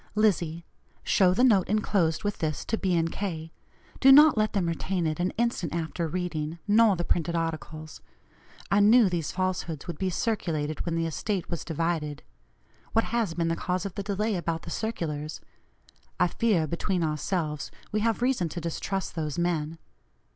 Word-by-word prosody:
"LIZZIE: 170 -6 +1 0.4
Show 185 -2 +4
the 245 - +3
note 210 -8 +5
enclosed 195 -5 +1
with 205 -1 -2
this 155 -3 -2
to - - 0
B. 185 -5 +1
& 165 - -3
K.; 165 -5 -4 0.5
do 270 - +7
not 300 +2 +8
let 215 -1 +1
them 195 -4 +1
retain 170 +1 -1
it 155 0 -1
an 180 +1 +1
instant 225 -9 0
after 165 0 -2
reading, 165 -2 -3
nor 215 -1 +5
the 175 - -2
printed 170 0 0
articles. 160 -1 -4 0.7
I 200 - +5
knew 215 +1 +6
these 170 -4 -2
falsehoods 185 -5 -2
would 170 -4 -6
be 190 - 0
circulated 165 -7 -2
when 165 - 0
the 165 0 0
estate 180 +4 -3
was 170 - -3
divided. 160 -2 -2 0.7
What 225 - +3
has 220 -8 0
been 165 -1 0
the 165 - +1
cause 180 +2 -2
of 195 - -4
the 200 - -4
delay 210 +2 -1
about 165 -2 -2
the 165 - -7
circulars? 155 -9 -3 0.8
I 180 - +5
fear, 205 -8 +2
between 170 +3 -1
ourselves, 155 0 -2 0.2
we 215 - +1
have 225 +2 0
reason 245 -10 +1
to 170 - -5
distrust 180 +3 -3
those 155 -2 -3
men 165 -2 -1
175 Hz, 175 wpm, -27 LUFS, 160-205 Hz, 0.8 s, not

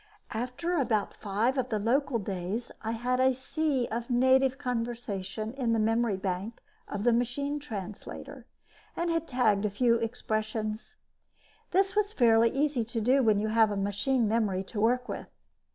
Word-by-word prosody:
After 255 +9 -2
about 240 - +1
five 225 +6 0
of 255 0 -1
the 215 - 0
local 250 +4 +1
days, 195 +2 -4
I 225 0 -2
had 250 +2 -1
a 260 0 +4
sea 265 -1 -1
of 235 +2 -3
native 260 +1 +4
conversation 230 -5 -3
in 250 -4 0
the 225 - +2
memory 225 -1 +2
bank 190 +4 -3 0.3
of 205 - -4
the 240 0 +4
machine 280 +5 -1
translator 240 +2 -8 0.5
and 340 0 -1
had 330 0 -1
tagged 220 -6 +2
a 210 - +1
few 230 +3 +3
expressions. 220 -1 -3 0.7
This 385 +2 +2
is 420 0 +1
fairly 230 - +5
easy 275 -2 0
to 230 +1 -4
do 255 +5 +3
when 220 -4 +4
you 215 +1 0
have 220 0 +4
a 205 - -2
machine 215 +5 +1
memory 205 -4 +1
to 205 +2 -5
work 250 +3 +2
with. - - -5
235 Hz, 165 wpm, -29 LUFS, 215-260 Hz, 0.7 s, fairly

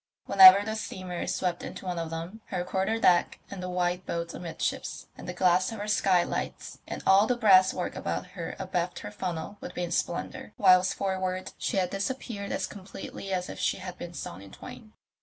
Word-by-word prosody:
Whenever 195 +1 +9
the 220 0 -2
steamer 185 -4 -5
swept 180 -2 -1
into - - -8
one 180 -2 -2
of 165 -1 -3
them 165 +7 -6
her 175 - -3
quarter 190 +4 -1
deck, 175 -5 +3
and 195 -2 -6
the 180 - -4
white 180 0 0
boats 170 -1 -4
amidships, 170 -2 -4
and - - -9
the - - -1
glass 180 +1 +3
of 225 - -6
her 205 0 -5
skylights 190 -4 0
and - - -6
all 195 +3 +6
the 250 - +1
brass 190 -5 +6
work 180 - -4
about 85 +2 -3
her 170 - -5
abaft 180 -2 -2
her - - -7
funnel, 185 -1 -5
would 180 - -8
be 180 - -2
in 175 - -4
splendour, 175 +4 -3
whilst 185 0 +5
forward 185 -1 -2
she - - -1
had 185 -2 +1
disappeared 200 0 -4
as - - -1
completely 195 0 -8
as 180 -1 -1
if - - -8
she - - +1
had 185 -1 -7
been 175 0 -7
sawn 90 - -6
in 100 -1 -13
twain. - - -11
185 Hz, 200 wpm, -28 LUFS, 175-195 Hz, -, Whenever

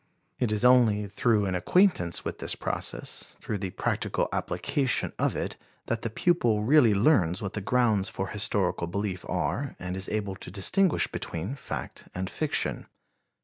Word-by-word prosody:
It 120 -4 +1
is 105 +2 +1
only 115 -5 +5
through 105 +1 +1
an 95 - -1
acquaintance 90 - +2
with - - -4
this - - +1
process, - - -3
through 105 - -4
the 95 -1 -3
practical - - -1
application 135 -3 0
of - - +1
it, - - -3 0.3
that 115 -1 -2
the 115 - -2
pupil 115 -6 +2
really 120 -3 +5
learns 100 - +3
what 100 -4 -5
the 105 - -3
grounds 110 -3 +2
for 95 0 -4
historical 100 -4 +1
belief 95 0 -3
are - - -2
and 90 0 -5
is 95 +1 -3
able 105 -2 -2
to - - -9
distinguish 150 - +2
between 90 +9 -5
fact 140 - -7
and 95 +1 -3
fiction. 155 -2 -1
105 Hz, 160 wpm, -27 LUFS, 95-125 Hz, 0.3 s, only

